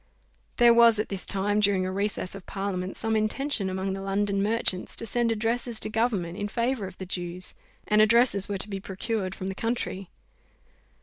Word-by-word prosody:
There 240 Hz, -1 st, +7 dB
was 235 Hz, -1 st, +6 dB
at 215 Hz, -, -2 dB
this 195 Hz, -2 st, -4 dB
time, 205 Hz, +2 st, +1 dB
during 200 Hz, -3 st, +3 dB
a 185 Hz, -, -2 dB
recess 200 Hz, -1 st, -2 dB
of 195 Hz, -2 st, -10 dB
parliament, 190 Hz, -1 st, -3 dB
some 225 Hz, 0 st, -1 dB
intention 215 Hz, 0 st, +1 dB
among 190 Hz, +1 st, -2 dB
the 195 Hz, -, -5 dB
London 195 Hz, 0 st, 0 dB
merchants 205 Hz, -3 st, -1 dB
to -, -, +2 dB
send 235 Hz, +1 st, 0 dB
addresses 230 Hz, +1 st, -1 dB
to -, -, -1 dB
government 205 Hz, -7 st, -1 dB
in 205 Hz, -, -2 dB
favour 235 Hz, -1 st, -1 dB
of 185 Hz, -, -12 dB
the 190 Hz, -, -6 dB
Jews; 180 Hz, 0 st, -3 dB, 0.3 s
and 210 Hz, 0 st, +4 dB
addresses 215 Hz, -2 st, +4 dB
were 200 Hz, -, -1 dB
to 195 Hz, -, -2 dB
be 195 Hz, -2 st, -4 dB
procured 195 Hz, 0 st, -3 dB
from 185 Hz, -, -6 dB
the 190 Hz, -, -2 dB
country. 200 Hz, -3 st, -3 dB
205 Hz, 190 wpm, -26 LUFS, 190-225 Hz, 0.3 s, There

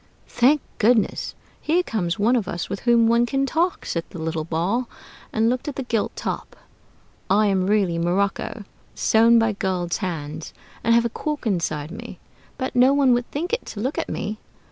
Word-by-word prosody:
"Thank 260 Hz, +5 st, +3 dB, 0.2 s
goodness, 225 Hz, 0 st, +2 dB, 0.3 s
here 345 Hz, +4 st, +2 dB
comes 180 Hz, -, -2 dB
one 225 Hz, +5 st, +3 dB
of 220 Hz, -7 st, 0 dB
us, 170 Hz, -, -4 dB
with 200 Hz, -, -3 dB
whom 235 Hz, -1 st, +4 dB
one 235 Hz, +1 st, +3 dB
can 270 Hz, +2 st, +1 dB
talk!" 335 Hz, +6 st, 0 dB
said 170 Hz, -, -2 dB
the -, -, -9 dB
little 160 Hz, -1 st, -2 dB
Ball, 180 Hz, +10 st, -1 dB, 0.4 s
and 220 Hz, +1 st, +2 dB
looked 250 Hz, +3 st, -1 dB
at 290 Hz, -, -3 dB
the 270 Hz, -, -3 dB
gilt 230 Hz, -4 st, -1 dB
Top. -, -, -4 dB, 0.7 s
"I 205 Hz, +3 st, +4 dB
am 190 Hz, -2 st, +1 dB
really 195 Hz, -5 st, +2 dB
morocco, 195 Hz, +5 st, -1 dB, 0.3 s
sewn 230 Hz, +1 st, +5 dB
by 225 Hz, 0 st, +3 dB
a -, -, -1 dB
girl's 185 Hz, -4 st, -1 dB
hands, 155 Hz, -5 st, -5 dB, 0.3 s
and 230 Hz, +1 st, +4 dB
have 235 Hz, 0 st, +4 dB
a -, -, +1 dB
cork 300 Hz, +3 st, -4 dB
inside 165 Hz, -7 st, -1 dB
me; 200 Hz, -, -8 dB, 0.4 s
but 260 Hz, 0 st, -3 dB
no 255 Hz, +2 st, +6 dB
one 275 Hz, -3 st, +4 dB
would 240 Hz, 0 st, 0 dB
think 345 Hz, +8 st, -4 dB
it 475 Hz, -, 0 dB
to 210 Hz, -, -7 dB
look 260 Hz, +7 st, -1 dB
at -, -, -3 dB
me. 210 Hz, +2 st, -4 dB
220 Hz, 190 wpm, -23 LUFS, 185-250 Hz, 0.7 s, no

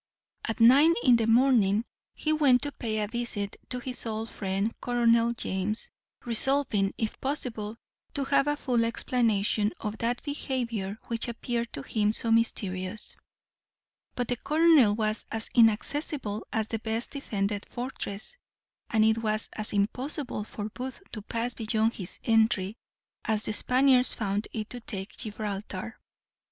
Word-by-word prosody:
At 225 Hz, -, -2 dB
nine 280 Hz, +8 st, +7 dB
in 245 Hz, -3 st, +6 dB
the 225 Hz, -1 st, 0 dB
morning 225 Hz, -3 st, +4 dB, 0.3 s
he 310 Hz, -, 0 dB
went 275 Hz, -5 st, +4 dB
to 290 Hz, -, -2 dB
pay 220 Hz, -5 st, -3 dB
a 210 Hz, -, -1 dB
visit 225 Hz, -3 st, -3 dB
to 250 Hz, -, -2 dB
his 250 Hz, 0 st, -5 dB
old 220 Hz, 0 st, -3 dB
friend 195 Hz, +2 st, -1 dB
Colonel 235 Hz, -1 st, +3 dB
James, 210 Hz, -2 st, -2 dB, 0.3 s
resolving, 235 Hz, -4 st, +1 dB
if 220 Hz, -2 st, -3 dB
possible, 230 Hz, -6 st, -3 dB, 0.4 s
to 280 Hz, -, 0 dB
have 275 Hz, +1 st, +2 dB
a 295 Hz, -, +2 dB
full 250 Hz, -5 st, +1 dB
explanation 220 Hz, -3 st, +1 dB
of 210 Hz, 0 st, -4 dB
that 240 Hz, +1 st, -1 dB
behaviour 240 Hz, -8 st, -3 dB
which 230 Hz, 0 st, -2 dB
appeared 235 Hz, 0 st, -3 dB
to 140 Hz, -, -4 dB
him 210 Hz, +4 st, +1 dB
so 230 Hz, 0 st, +1 dB
mysterious: 200 Hz, -3 st, 0 dB, 1.0 s
but 245 Hz, -1 st, -1 dB
the 245 Hz, -, -1 dB
colonel 305 Hz, -7 st, +5 dB
was 215 Hz, 0 st, -1 dB
as 225 Hz, 0 st, -3 dB
inaccessible 230 Hz, 0 st, +1 dB
as 220 Hz, -2 st, 0 dB
the 225 Hz, -, -2 dB
best 225 Hz, +1 st, -2 dB
defended 205 Hz, -7 st, -2 dB
fortress; 245 Hz, -, -5 dB, 0.5 s
and 220 Hz, -2 st, +4 dB
it 220 Hz, +1 st, +3 dB
was 215 Hz, -1 st, -1 dB
as 215 Hz, 0 st, -1 dB
impossible 245 Hz, +4 st, -1 dB
for 210 Hz, 0 st, -6 dB
Booth 255 Hz, +3 st, -6 dB
to 215 Hz, -, -6 dB
pass 235 Hz, +3 st, -2 dB
beyond 225 Hz, 0 st, +1 dB
his 185 Hz, -4 st, -5 dB
entry 220 Hz, -3 st, +2 dB, 0.5 s
as 215 Hz, -1 st, 0 dB
the 215 Hz, -, -1 dB
Spaniards 255 Hz, +2 st, +4 dB
found 205 Hz, 0 st, -1 dB
it 215 Hz, -2 st, -4 dB
to 245 Hz, -, -4 dB
take 200 Hz, -4 st, -6 dB
Gibraltar. 210 Hz, -2 st, -5 dB
225 Hz, 145 wpm, -28 LUFS, 210-250 Hz, 1.0 s, nine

